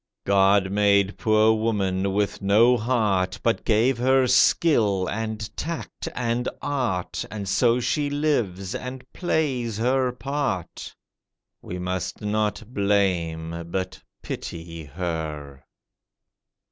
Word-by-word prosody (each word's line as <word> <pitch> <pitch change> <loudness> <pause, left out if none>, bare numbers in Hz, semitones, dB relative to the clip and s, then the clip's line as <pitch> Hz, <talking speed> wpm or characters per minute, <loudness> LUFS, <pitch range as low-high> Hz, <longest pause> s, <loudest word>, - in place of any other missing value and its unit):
God 100 0 +3
made 100 -1 +3
poor 110 0 +4
woman 100 -4 0
with 100 0 -1
no 110 +5 +5
heart, 105 -6 0
But 115 - +1
gave 120 +3 +2
her 130 +1 +4
skill, 115 - +3
and 110 0 -4
tact, 165 -1 -5
and 120 0 -1
art, 125 -11 -2
And 105 -1 -6
so 120 +4 +3
she 145 +4 0
lives, 120 -11 -1
and 125 0 -6
plays 130 - -1
her 125 +2 +1
part. 130 - -4 0.7
We 90 - -6
must 90 0 -3
not 105 +1 -1
blame, 85 -5 0
but 95 +1 -4 0.2
pity 85 -1 -6
her. 75 -3 -5
105 Hz, 110 wpm, -24 LUFS, 95-125 Hz, 0.7 s, no